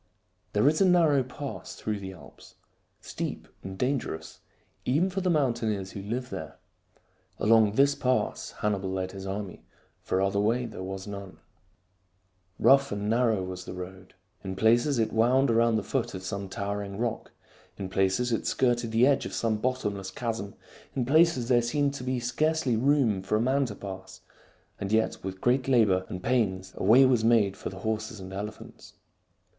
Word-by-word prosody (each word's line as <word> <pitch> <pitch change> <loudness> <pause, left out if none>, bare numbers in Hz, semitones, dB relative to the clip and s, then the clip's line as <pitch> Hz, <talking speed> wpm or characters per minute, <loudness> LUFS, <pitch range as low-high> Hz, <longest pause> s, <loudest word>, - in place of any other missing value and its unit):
There 105 +6 +3
is 155 +5 +3
a - - +6
narrow 165 -6 +4
pass 130 +2 -7
through 105 -1 -3
the 95 -1 -7
Alps, 95 - -15 0.5
steep - - -5
and 95 0 -7
dangerous 125 - -3 0.4
even 160 +9 +1
for 195 +1 -2
the 185 - 0
mountaineers 115 - 0
who 100 - -7
live 120 +5 -4
there. - - -7 0.8
Along 110 -1 +4
this 140 +4 +4
pass 130 -2 -1
Hannibal 100 -2 0
led 95 0 -3
his 95 0 -8
army, 95 -1 -5 0.4
for 95 - -1
other 100 +1 +1
way 115 +4 +1
there 110 -5 -8
was 95 0 -5
none. 100 -2 -8 1.2
Rough 140 0 +5
and 100 +1 -2
narrow 115 -4 +2
was 90 0 -6
the - - -7
road. 90 +1 -9 0.3
In 95 -1 -4
places 120 +7 +3
it 110 -1 0
wound 125 +3 +3
around 115 0 +3
the 110 - 0
foot 120 -3 -2
of 95 - -7
some 100 +1 -4
towering 100 0 -4
rock; 115 0 -3 0.5
in 95 - -4
places 95 +6 +1
it 115 - -1
skirted 120 -2 +1
the 115 +3 +4
edge 140 0 +2
of - - -9
some 110 -2 0
bottomless 105 -5 -2
chasm; 110 -1 -4 0.4
in 125 - 0
places 155 -3 +3
there 120 -1 +4
seemed 140 +4 0
to 140 - -6
be 130 0 -1
scarcely 150 +1 0
room 125 -5 +2
for 95 +3 -1
a - - +2
man 135 +4 +2
to 105 - -7
pass, 95 -2 -9 0.6
and 100 0 -4
yet 110 0 +1
with 95 0 -5
great 125 +1 +2
labor 105 -8 +3
and 90 0 -6
pains 95 -7 0
a - - -5
way 120 +7 +7
was 125 -4 +3
made 110 -4 +3
for - - -6
the 95 0 -10
horses 110 0 -3
and 95 0 -9
elephants. 105 +2 -8
110 Hz, 175 wpm, -28 LUFS, 95-125 Hz, 1.2 s, way